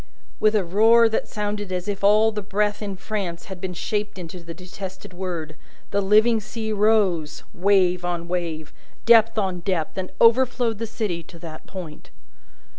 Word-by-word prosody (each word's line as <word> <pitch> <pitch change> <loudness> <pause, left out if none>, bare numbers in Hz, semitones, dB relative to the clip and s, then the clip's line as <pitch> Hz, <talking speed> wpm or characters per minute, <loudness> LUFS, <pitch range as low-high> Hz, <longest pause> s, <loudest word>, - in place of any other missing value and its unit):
With 215 0 +3
a 205 - +3
roar 225 +6 +5
that 220 - -1
sounded 205 -2 -4
as 180 0 -3
if 200 -1 -4
all 215 +2 +5
the 210 -1 -4
breath 205 +1 -1
in 200 -2 -4
France 185 -3 -4
had 190 -3 -9
been 185 -1 -4
shaped 210 +3 -3
into 180 0 -8
the 170 -1 -9
detested 185 +1 -9
word, 175 -4 -5 0.4
the 200 - +1
living 215 +3 +4
sea 220 +1 -5
rose, 195 -8 +1
wave 180 -1 +2
on 175 -1 -3
wave, 165 -3 -4 0.3
depth 225 -1 +6
on 190 -4 -1
depth, 170 -3 -2
and 185 - -4
overflowed 235 -1 +3
the 230 - -3
city 205 -6 -3
to 170 +1 -14
that 160 -2 -10
point. 175 -6 -9
195 Hz, 170 wpm, -23 LUFS, 175-215 Hz, 0.4 s, depth